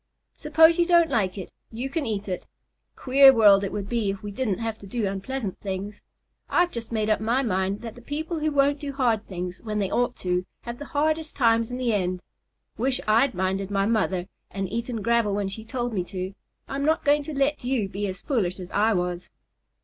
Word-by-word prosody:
"Suppose 320 Hz, +2 st, +4 dB
you 340 Hz, -, +3 dB
don't 340 Hz, -3 st, +4 dB
like 205 Hz, -6 st, 0 dB
it, 190 Hz, -, -7 dB, 0.2 s
you 235 Hz, +4 st, -4 dB
can 290 Hz, -1 st, -2 dB
eat 210 Hz, -2 st, -3 dB
it. 185 Hz, -2 st, -4 dB, 0.5 s
Queer 270 Hz, +1 st, +7 dB
world 205 Hz, -5 st, +6 dB
it 195 Hz, -, -2 dB
would 205 Hz, -2 st, -4 dB
be 230 Hz, -3 st, 0 dB
if 195 Hz, 0 st, -4 dB
we 205 Hz, -, -5 dB
didn't 205 Hz, -2 st, -1 dB
have 225 Hz, -1 st, -4 dB
to 200 Hz, -, -11 dB
do 225 Hz, +2 st, -2 dB
unpleasant 195 Hz, +2 st, -4 dB
things. 200 Hz, +1 st, -5 dB, 0.5 s
I've 350 Hz, 0 st, +3 dB
just 235 Hz, -1 st, -6 dB
made 215 Hz, -2 st, 0 dB
up 215 Hz, -1 st, +2 dB
my 240 Hz, +5 st, +1 dB
mind 195 Hz, -2 st, -1 dB
that 230 Hz, -2 st, -7 dB
the 245 Hz, -, -14 dB
people 315 Hz, +6 st, -4 dB
who 310 Hz, 0 st, 0 dB
won't 285 Hz, 0 st, +2 dB
do 280 Hz, -1 st, -5 dB
hard 235 Hz, -6 st, +1 dB
things, 180 Hz, 0 st, -5 dB
when 215 Hz, -2 st, -3 dB
they 200 Hz, -2 st, -1 dB
ought 245 Hz, 0 st, +1 dB
to, 180 Hz, 0 st, -1 dB, 0.2 s
have 235 Hz, 0 st, -7 dB
the 290 Hz, -, -6 dB
hardest 310 Hz, +1 st, 0 dB
times 230 Hz, -3 st, +3 dB
in 250 Hz, -, -4 dB
the 245 Hz, -3 st, 0 dB
end. 185 Hz, -2 st, -1 dB, 0.6 s
Wish 260 Hz, +2 st, +1 dB
I'd 230 Hz, +3 st, +3 dB
minded 190 Hz, +1 st, -1 dB
my 200 Hz, -1 st, +1 dB
mother 200 Hz, -5 st, +1 dB, 0.2 s
and 195 Hz, -1 st, -3 dB
eaten 230 Hz, -1 st, -3 dB
gravel 235 Hz, -2 st, +2 dB
when 200 Hz, -1 st, -1 dB
she 220 Hz, +3 st, -7 dB
told 240 Hz, 0 st, -3 dB
me 185 Hz, -4 st, 0 dB
to, 185 Hz, 0 st, -5 dB
and 190 Hz, -, -8 dB, 0.3 s
I'm 275 Hz, +1 st, -3 dB
not 315 Hz, +2 st, +1 dB
going 295 Hz, +1 st, +4 dB
to 290 Hz, -1 st, -6 dB
let 275 Hz, +1 st, +1 dB
you 245 Hz, -5 st, 0 dB
be 200 Hz, +2 st, -3 dB
as 185 Hz, +1 st, -6 dB
foolish 200 Hz, -, -1 dB
as 180 Hz, -1 st, -8 dB
I 220 Hz, +2 st, +3 dB
was." 180 Hz, -1 st, -2 dB
225 Hz, 220 wpm, -25 LUFS, 195-270 Hz, 0.6 s, Queer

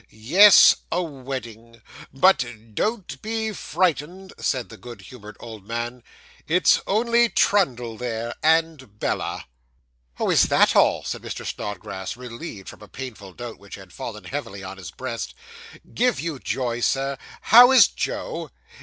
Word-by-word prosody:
'Yes, 180 Hz, -, +7 dB
a 180 Hz, -, 0 dB
wedding. 120 Hz, -6 st, -8 dB, 0.3 s
But 185 Hz, +9 st, +4 dB, 0.3 s
don't 215 Hz, -, -3 dB
be 220 Hz, 0 st, -3 dB
frightened,' 180 Hz, +2 st, -2 dB
said 130 Hz, -4 st, -2 dB
the 110 Hz, -, -12 dB
good 120 Hz, -3 st, -11 dB
humoured 105 Hz, -1 st, -12 dB
old 110 Hz, -4 st, -11 dB
man; 120 Hz, +2 st, -4 dB, 0.5 s
'it's 175 Hz, +3 st, +3 dB
only 235 Hz, +3 st, +2 dB
Trundle 125 Hz, -, +1 dB
there, 115 Hz, -1 st, -4 dB
and 160 Hz, -8 st, +1 dB
Bella.' -, -, -3 dB, 0.7 s
'Oh, -, -, +1 dB
is -, -, +4 dB
that -, -, +3 dB
all?' -, -, +3 dB
said -, -, -5 dB
Mr. -, -, -7 dB
Snodgrass, 95 Hz, 0 st, -6 dB
relieved 120 Hz, -, -9 dB
from -, -, -11 dB
a 105 Hz, -, -12 dB
painful 110 Hz, -8 st, -9 dB
doubt 120 Hz, +3 st, -8 dB
which 100 Hz, 0 st, -11 dB
had 95 Hz, -2 st, -14 dB
fallen 105 Hz, +1 st, -7 dB
heavily 100 Hz, -9 st, -6 dB
on 95 Hz, +1 st, -8 dB
his 95 Hz, -3 st, -9 dB
breast. 125 Hz, -3 st, -6 dB, 0.6 s
'Give 250 Hz, 0 st, +1 dB
you 165 Hz, -5 st, -4 dB
joy, 120 Hz, -3 st, -3 dB
Sir. 135 Hz, +2 st, -1 dB, 0.2 s
How 245 Hz, +3 st, +8 dB
is 260 Hz, -, +8 dB
Joe? -, -, -4 dB
125 Hz, 145 wpm, -23 LUFS, 110-170 Hz, 0.7 s, How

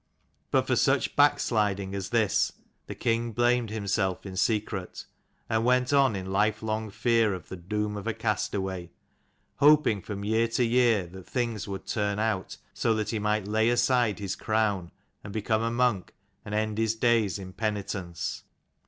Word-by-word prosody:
But -, -, +2 dB
for -, -, +1 dB
such -, -, +2 dB
backsliding 100 Hz, -3 st, +2 dB
as 95 Hz, -2 st, -4 dB
this 115 Hz, -4 st, +2 dB, 0.3 s
the -, -, -6 dB
king 115 Hz, 0 st, -1 dB
blamed 120 Hz, 0 st, +2 dB
himself 100 Hz, -3 st, -1 dB
in 95 Hz, -1 st, -7 dB
secret, 100 Hz, -1 st, -1 dB, 0.4 s
and 110 Hz, 0 st, +1 dB
went 125 Hz, +2 st, +2 dB
on 135 Hz, -6 st, +4 dB
in 95 Hz, 0 st, -5 dB
life 105 Hz, +2 st, +1 dB
long 110 Hz, 0 st, -2 dB
fear 115 Hz, -1 st, +2 dB
of 90 Hz, -, -11 dB
the -, -, -5 dB
doom 105 Hz, +4 st, -3 dB
of 100 Hz, -, -6 dB
a -, -, 0 dB
castaway; 95 Hz, -3 st, -2 dB, 0.7 s
hoping 145 Hz, -8 st, +5 dB
from 100 Hz, 0 st, -6 dB
year 110 Hz, +2 st, +2 dB
to 115 Hz, +2 st, 0 dB
year 115 Hz, -4 st, +3 dB
that 90 Hz, +1 st, -12 dB
things 115 Hz, -4 st, -2 dB
would 100 Hz, -1 st, -6 dB
turn 105 Hz, -2 st, -1 dB
out 110 Hz, -3 st, -2 dB, 0.2 s
so 115 Hz, -2 st, +1 dB
that 110 Hz, -1 st, -2 dB
he 110 Hz, -, -1 dB
might 105 Hz, -1 st, 0 dB
lay 110 Hz, +2 st, +2 dB
aside 120 Hz, -3 st, +2 dB
his 100 Hz, -2 st, -3 dB
crown, 105 Hz, -5 st, 0 dB, 0.3 s
and 100 Hz, -, -8 dB
become 110 Hz, 0 st, 0 dB
a 115 Hz, -, 0 dB
monk, 120 Hz, -5 st, 0 dB, 0.3 s
and 105 Hz, -, -5 dB
end 110 Hz, 0 st, -1 dB
his 115 Hz, 0 st, +1 dB
days 110 Hz, -5 st, +2 dB
in 95 Hz, -1 st, -9 dB
penitence. 95 Hz, -7 st, -3 dB
105 Hz, 170 wpm, -27 LUFS, 100-115 Hz, 0.7 s, hoping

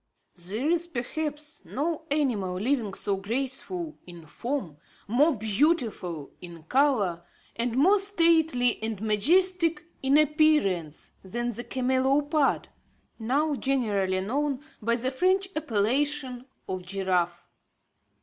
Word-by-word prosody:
There 195 Hz, -, -2 dB
is 340 Hz, +1 st, +1 dB
perhaps 300 Hz, +2 st, -4 dB
no 315 Hz, +3 st, -3 dB
animal 240 Hz, -11 st, 0 dB
living 225 Hz, -3 st, 0 dB
so 195 Hz, 0 st, -1 dB
graceful 270 Hz, -, -3 dB
in 170 Hz, -2 st, -11 dB
form, 215 Hz, -, -4 dB, 0.3 s
more 275 Hz, +8 st, +3 dB
beautiful 215 Hz, -, 0 dB
in 170 Hz, -2 st, -10 dB
colour, 205 Hz, -, +1 dB, 0.3 s
and 235 Hz, +1 st, -1 dB
more 380 Hz, +9 st, +5 dB
stately 325 Hz, -, +3 dB
and 220 Hz, -2 st, -3 dB
majestic 335 Hz, -, +2 dB, 0.2 s
in 270 Hz, +2 st, +4 dB
appearance 300 Hz, -, +2 dB
than 240 Hz, +5 st, -3 dB
the 240 Hz, +2 st, -5 dB
camelopard, 270 Hz, +4 st, +1 dB, 0.5 s
now 280 Hz, +7 st, +1 dB
generally 210 Hz, -9 st, 0 dB
known 275 Hz, +6 st, -1 dB, 0.2 s
by 235 Hz, +2 st, +2 dB
the 255 Hz, +2 st, -1 dB
French 375 Hz, +7 st, +1 dB
appellation 265 Hz, 0 st, 0 dB, 0.2 s
of 185 Hz, -1 st, -3 dB
giraffe. 180 Hz, -2 st, -1 dB
255 Hz, 110 wpm, -27 LUFS, 200-300 Hz, 0.5 s, more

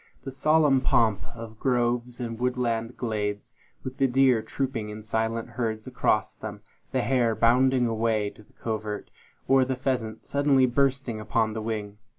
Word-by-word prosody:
The 135 Hz, -, -5 dB
solemn 145 Hz, 0 st, +3 dB
pomp 110 Hz, -5 st, +2 dB
of 115 Hz, -1 st, -9 dB
groves 120 Hz, -1 st, 0 dB
and 115 Hz, -2 st, -4 dB
woodland 125 Hz, -2 st, -1 dB
glades, 105 Hz, -3 st, -3 dB, 0.3 s
with 130 Hz, 0 st, -6 dB
the 135 Hz, -1 st, +3 dB
deer 130 Hz, -2 st, +4 dB
trooping 125 Hz, -4 st, -3 dB
in 105 Hz, +1 st, -8 dB
silent 110 Hz, +1 st, -1 dB
herds 110 Hz, -3 st, -3 dB
across 125 Hz, -4 st, 0 dB
them; 105 Hz, -1 st, -8 dB, 0.3 s
the 130 Hz, -, +1 dB
hare, 120 Hz, -4 st, +2 dB
bounding 125 Hz, +2 st, +4 dB
away 110 Hz, -2 st, 0 dB
to -, -, -17 dB
the 105 Hz, -, -23 dB
covert; 110 Hz, -2 st, -4 dB, 0.4 s
or 135 Hz, 0 st, +5 dB
the 130 Hz, 0 st, -1 dB
pheasant, 125 Hz, -4 st, -2 dB
suddenly 140 Hz, -2 st, +3 dB
bursting 130 Hz, -2 st, 0 dB
upon 110 Hz, 0 st, 0 dB
the 110 Hz, -, -4 dB
wing. 105 Hz, -2 st, -4 dB
115 Hz, 160 wpm, -26 LUFS, 110-130 Hz, 0.4 s, or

